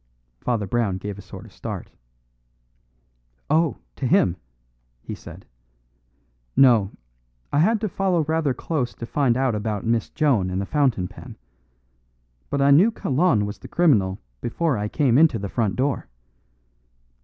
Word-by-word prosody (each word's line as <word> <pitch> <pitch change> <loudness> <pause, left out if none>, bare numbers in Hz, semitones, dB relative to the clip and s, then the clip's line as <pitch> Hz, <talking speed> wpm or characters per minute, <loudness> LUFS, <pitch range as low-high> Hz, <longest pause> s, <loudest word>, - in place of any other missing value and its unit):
Father 115 - -1
Brown 105 -2 0
gave 100 +1 -6
a - - -8
sort 95 - -11
of - - -16
start. - - -7 1.6
"Oh! 160 -1 +2 0.2
to 130 - -1
him," 135 - +3 0.7
he - - -6
said. - - -11 1.1
"No; 115 -7 +5 0.6
I 145 - +3
had 215 +8 +3
to 215 - 0
follow 185 -4 0
rather 160 -1 0
close 130 -4 -2
to 115 - -6
find 125 -1 +1
out 130 -2 +1
about 105 -1 -3
Miss 115 -1 0
Joan 125 -12 +1
and 90 +1 -2
the 100 - -2
fountain 130 -9 +1
pen. - - -12 1.1
But 140 -1 0
I 140 - +5
knew 175 +11 +6
Kalon 140 - +1
was 100 0 -6
the - - -10
criminal 105 - +2 0.2
before 155 +4 0
I 105 -1 -2
came 130 +1 +2
into 155 -7 +5
the 100 -2 -5
front 105 -4 -1
door." 135 0 -1
125 Hz, 150 wpm, -23 LUFS, 105-155 Hz, 1.6 s, knew